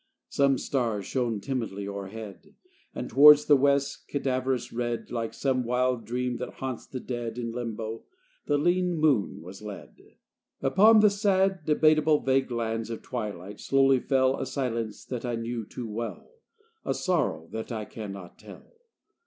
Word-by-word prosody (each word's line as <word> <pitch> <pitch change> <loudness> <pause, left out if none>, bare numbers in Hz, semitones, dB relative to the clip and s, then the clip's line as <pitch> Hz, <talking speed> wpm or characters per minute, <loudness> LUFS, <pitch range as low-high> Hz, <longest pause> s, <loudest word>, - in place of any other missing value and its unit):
Some 140 -1 +3
stars 115 -9 -1
shone 120 -5 -1
timidly 110 -6 -3
o'erhead; 100 - -8 0.4
And 125 - -4
towards 150 +2 +8
the 145 - +6
west's 140 0 +2
cadaverous 130 -2 -2
red 120 -1 -3
Like 115 -2 -2
some 130 -2 0
wild 125 -1 0
dream 125 +2 -2
that 125 - -6
haunts 130 -3 -5
the 130 - -6
dead 120 -2 -5
In 115 -1 -3
limbo 115 -1 -5 0.4
the 145 - +2
lean 175 +3 +1
moon 145 - +1
was 95 +3 -10
led. 105 -2 -9 0.6
Upon 215 +10 +6
the 210 -1 +6
sad, 195 -3 +1
debatable 155 0 +4
Vague 135 0 +1
lands 115 -1 -2
of 115 - -6
twilight 105 -5 -5
slowly 135 -1 +3
fell 130 0 +2
A - - -3
silence 115 -5 -3
that 125 -3 -5
I 120 -1 -2
knew 115 -1 -4
too 120 - -6
well, 115 - -6 0.5
A - - -1
sorrow 165 - 0
that 110 +2 -5
I 110 -2 -3
can 105 -2 -7
not 95 -3 -10
tell. - - -14
125 Hz, 155 wpm, -27 LUFS, 115-140 Hz, 0.6 s, towards